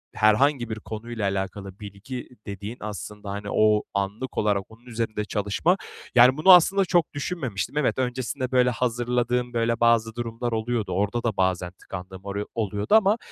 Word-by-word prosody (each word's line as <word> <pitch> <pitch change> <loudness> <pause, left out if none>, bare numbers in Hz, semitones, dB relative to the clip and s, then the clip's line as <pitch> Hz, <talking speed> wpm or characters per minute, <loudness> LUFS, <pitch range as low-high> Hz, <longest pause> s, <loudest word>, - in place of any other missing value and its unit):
herhangi 120 +4 +3
bir 110 - -2
konuyla 110 +1 -6
alakalı 95 0 -5
bilgi 105 +5 -8 0.2
dediğin 100 +4 -6
aslında, 105 -1 -7
hani, 100 +1 -5
o 105 -1 +3
anlık 100 +6 -3
olarak 105 -2 +1
onun 115 +2 -17
üzerinde 115 -3 -3
çalışma. 105 - +1 0.4
Yani, 125 +3 +7
bunu 160 +5 +6
aslında 190 +3 +5
çok 175 -3 +1
düşünmemiştim. 140 - -3
Evet, 150 - +1
öncesinde, 130 +1 -2
böyle, 125 -1 +4
hazırladığım, 120 0 -1
böyle, 115 0 0
bazı 115 -1 +3
durumlar 120 0 -3
oluyordu. 110 -2 -2
Orada 105 +5 -1
da 110 -4 -1
bazen 90 -1 0
tıkandığım 95 0 -9
oru 100 +1 -4
oluyordu 105 - 0
ama, 215 0 +5
115 Hz, 155 wpm, -25 LUFS, 100-125 Hz, 0.4 s, Yani